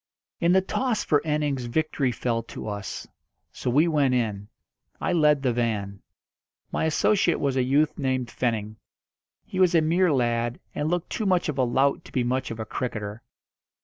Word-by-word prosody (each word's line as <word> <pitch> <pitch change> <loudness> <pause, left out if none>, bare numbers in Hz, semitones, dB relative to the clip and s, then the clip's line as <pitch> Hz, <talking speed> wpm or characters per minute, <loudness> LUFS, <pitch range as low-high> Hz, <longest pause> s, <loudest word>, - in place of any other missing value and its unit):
In 170 - +3
the 190 - +5
toss 230 +4 -1
for 145 -3 +2
innings 150 -4 -1
victory 140 0 0
fell 120 -1 -1
to 115 - -8
us. 100 -2 -5 0.5
So - - -4
we 150 +7 +4
went 145 -5 +2
in. 105 -4 -1 0.5
I - - 0
led 150 -4 +3
the 125 -3 +2
van. 105 -5 -2 0.7
My - - 0
associate 170 +3 +2
was 140 -2 0
a 130 - +2
youth 145 +5 +2
named 130 -3 -1
Fenning. 110 -3 -2 0.7
He 185 - -5
was 180 -2 +4
a 165 - +6
mere 170 +3 +3
lad, 120 -2 0
and 150 - -1
looked 175 0 -2
too 215 - -1
much 180 -3 +2
of 140 -3 -3
a - - +4
lout 135 +3 +1
to - - -13
be 125 - 0
much 130 +2 -1
of 115 - -6
a 110 - -3
cricketer. 105 -2 -4
130 Hz, 180 wpm, -25 LUFS, 120-155 Hz, 0.7 s, a